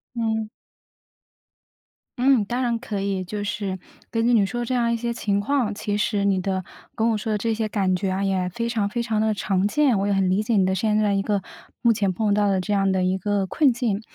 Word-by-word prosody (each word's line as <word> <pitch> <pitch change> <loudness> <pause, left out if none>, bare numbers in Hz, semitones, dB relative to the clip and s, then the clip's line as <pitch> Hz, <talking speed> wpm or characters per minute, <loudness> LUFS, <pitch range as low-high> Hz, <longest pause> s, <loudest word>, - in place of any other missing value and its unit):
嗯。 220 -2 -1 1.7
嗯， 250 -4 +3
当 245 +4 -2
然 235 -2 0
可 210 -5 -4
以， 195 -2 -2
就 205 +3 -4
是 200 -2 -3 0.3
根 225 -1 0
据 245 - +3
你 210 -4 +4
说 240 +4 -3
这 245 +2 -2
样 235 -1 +1
一 - - +1
些 235 +1 -2
情 205 -3 -1
况， 235 -2 0
其 205 0 -2
实 205 -1 0
你 195 -1 +2
的 190 0 -2 0.3
跟 225 +1 +1
我 220 - +1
说 215 +1 -2
的 210 - +1
这 225 +2 -1
些 220 0 -1
感 195 -3 0
觉 190 +1 -1
啊， 190 +1 -1
也 190 -2 0
非 230 +6 -3
常 215 -4 0
非 235 +3 -2
常 220 -2 -1
地 220 0 +2
常 195 -1 0
见， 270 -4 +2
我 200 - 0
也 205 - +2
很 195 -1 +2
理 190 +3 +2
解 220 +1 0
你 190 -2 +4
的 190 - +1
现 210 +2 +1
在 210 -1 +2
一 195 - +1
个 205 -1 0 0.4
目 235 - +4
前 205 -4 0
碰 210 +2 +1
到 205 0 +2
的 190 -1 +1
这 210 - -4
样 195 -1 +2
的 185 - +1
一 185 +1 +1
个 200 0 0
困 270 +5 +3
境。 230 -4 -1
210 Hz, 265 characters per minute, -23 LUFS, 195-230 Hz, 1.7 s, 你